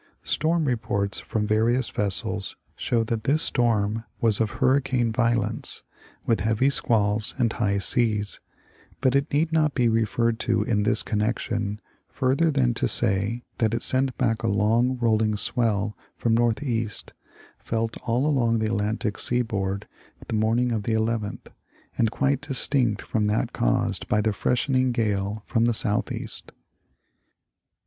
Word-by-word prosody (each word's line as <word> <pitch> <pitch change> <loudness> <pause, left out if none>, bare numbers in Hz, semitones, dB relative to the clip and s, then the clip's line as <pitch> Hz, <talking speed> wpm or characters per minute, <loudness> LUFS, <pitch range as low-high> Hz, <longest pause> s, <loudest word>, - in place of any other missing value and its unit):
Storm 165 0 +1
reports 100 -6 -1
from 110 -1 -2
various 115 +4 +2
vessels 100 0 -2 0.2
show 115 -2 0
that 110 -1 -3
this 155 +4 +3
storm 110 -4 +1 0.2
was 110 -3 +2
of 110 - +1
hurricane 130 -3 +2
violence, 115 0 0 0.4
with 115 - +2
heavy 110 +7 +2
squalls 105 -4 +1
and 120 -3 +1
high 100 -4 0
seas, 105 0 0 0.6
but 130 -1 +2
it 140 +2 +1
need 155 +3 +1
not 155 -2 +2
be 125 -3 +3
referred 115 +1 +1
to 115 -3 +1
in 105 -1 0
this 105 - +2
connection 105 -1 -2 0.3
further 140 +5 +1
than 130 -5 +2
to - - 0
say 105 +5 +1 0.2
that 115 -1 +2
it - - -2
sent 130 0 +1
back 115 -4 0
a - - -1
long 115 +6 +2
rolling 110 -2 +2
swell 105 -2 0 0.2
from 115 - 0
northeast, 115 -1 -1 0.5
felt 115 0 -2
all 120 +4 -1
along 120 -6 +2
the 110 -1 0
Alantic 105 0 -2
sea 125 0 +1
board 100 -4 -3 0.4
the - - -5
morning 115 +3 +1
of 110 -2 -1
the 110 +2 -2
11th, 110 -1 -1 0.5
and 115 - +2
quite 140 +3 0
distinct 130 -5 +1
from 110 -2 -1
that 105 +1 0
caused - - 0
by 105 - +2
the 105 0 +1
freshening 130 +4 +1
gale 105 -2 -1
from 115 -1 +1
the 120 -1 +1
southeast. 105 -1 -2
115 Hz, 145 wpm, -25 LUFS, 105-125 Hz, 0.6 s, this